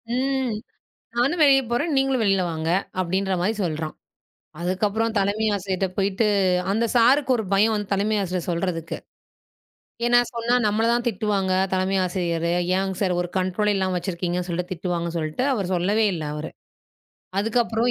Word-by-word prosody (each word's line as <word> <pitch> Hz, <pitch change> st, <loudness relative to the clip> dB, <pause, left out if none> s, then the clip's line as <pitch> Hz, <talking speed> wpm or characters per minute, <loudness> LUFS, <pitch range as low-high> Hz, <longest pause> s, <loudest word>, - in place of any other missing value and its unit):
ம். 265 Hz, -2 st, 0 dB, 0.6 s
நானும் 280 Hz, +8 st, +2 dB
வெளிய 270 Hz, -2 st, +6 dB
போறேன். 285 Hz, +7 st, 0 dB
நீங்களும் 270 Hz, -2 st, +2 dB
வெளில 195 Hz, -2 st, +3 dB
வாங்க! 160 Hz, 0 st, -3 dB, 0.3 s
அப்டின்ற 190 Hz, +2 st, 0 dB
மாரி 210 Hz, +5 st, +1 dB
சொல்றான். 155 Hz, -2 st, -3 dB, 0.7 s
அதுக்கப்பறம் 210 Hz, +5 st, 0 dB
தலைமை 205 Hz, +3 st, +1 dB
ஆசிரியர்ட்ட 190 Hz, -1 st, -1 dB
போயிட்டு 200 Hz, +2 st, +1 dB, 0.4 s
அந்த 225 Hz, +4 st, +1 dB
சார்க்கு 260 Hz, +4 st, +4 dB
ஒரு 220 Hz, -, -3 dB
பயம் 215 Hz, +3 st, +4 dB
வந்து 205 Hz, -1 st, -3 dB
தலைமை 210 Hz, +2 st, +1 dB
ஆசிரியர் 185 Hz, -2 st, -3 dB
சொல்றதுக்கு. 170 Hz, -1 st, -2 dB, 1.1 s
ஏனா, 240 Hz, 0 st, +5 dB, 0.2 s
சொன்னா 235 Hz, +1 st, 0 dB
நம்மள 215 Hz, +2 st, +1 dB
தான் 240 Hz, 0 st, +1 dB
திட்டுவாங்க, 195 Hz, -3 st, 0 dB, 0.2 s
தலைமை 190 Hz, +1 st, +1 dB
ஆசிரியர். 170 Hz, -2 st, -1 dB, 0.3 s
ஏங்க 190 Hz, 0 st, -1 dB
சார் 185 Hz, -3 st, +1 dB
ஒரு 175 Hz, -, -2 dB
கன்ட்ரோலே 195 Hz, +3 st, +1 dB
இல்லாம 190 Hz, -1 st, 0 dB
வச்சிருக்கீங்கன்னு 175 Hz, 0 st, -2 dB
சொல்ட்டு 175 Hz, +1 st, -2 dB
திட்டுவாங்க 175 Hz, -1 st, -2 dB
சொல்ட்டு, 155 Hz, +8 st, -2 dB
அவர் 200 Hz, -7 st, -1 dB
சொல்லவே 200 Hz, +5 st, +2 dB
இல்ல 160 Hz, -3 st, -4 dB
அவரு. 150 Hz, +1 st, -5 dB, 0.9 s
அதுக்கப்பறம் 225 Hz, +2 st, +1 dB
195 Hz, 145 wpm, -23 LUFS, 180-225 Hz, 1.1 s, வெளிய